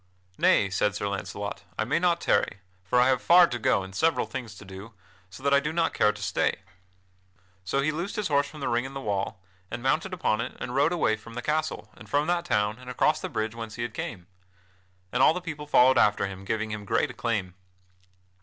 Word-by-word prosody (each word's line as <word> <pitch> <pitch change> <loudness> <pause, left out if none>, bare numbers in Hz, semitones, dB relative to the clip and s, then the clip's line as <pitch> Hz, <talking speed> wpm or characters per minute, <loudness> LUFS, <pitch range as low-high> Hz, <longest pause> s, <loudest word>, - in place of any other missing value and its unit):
"Nay," 95 -2 +4
said 105 +2 +1
Sir 100 - -2
Launcelot: 100 +1 -5
"I - - +1
may 140 +9 +1
not 175 -1 +2
tarry, 100 - +1 0.2
for 95 +7 +2
I 125 - +5
have 130 -1 +2
far 175 +1 +7
to 125 -7 -4
go 100 - +2
and 95 0 -10
several 165 +11 +2
things 120 -5 -7
to 100 - -12
do, 95 +4 -10 0.4
so 95 +8 -12
that 140 0 +2
I 140 - +6
do 150 +2 -3
not 165 0 0
care 105 - +3
to 105 0 -11
stay." 105 -1 0 1.0
So 135 +9 0
he 150 +3 +1
loosed 170 +6 -4
his 210 -3 -1
horse 140 -1 +2
from 150 - -11
the - - -1
ring 120 +1 +1
in 135 +1 -8
the - - -3
wall, 100 -3 -3 0.3
and 120 +1 -6
mounted 155 +8 +1
upon 115 -11 0
it - - -6
and 120 - -5
rode 140 +5 +3
away 145 -11 +1
from 115 +1 -13
that 120 - -4
castle 155 +2 -2
and - - -14
from 145 +1 +2
that 175 +1 0
town 105 -6 0
and 125 0 -10
across 125 - +2
the - - -4
bridge 110 0 -2
whence 115 -2 -7
he 120 - -3
had 120 -2 -4
come. 95 -6 -5 0.9
And - - +1
all - - +6
the - - -1
people 155 -4 -7
followed 130 -3 +5
after 105 -1 +3
him, 95 0 -7
giving 110 +2 -2
him 105 -1 -5
great 100 - 0
acclaim. 100 -7 -2
120 Hz, 230 wpm, -27 LUFS, 105-150 Hz, 1.0 s, far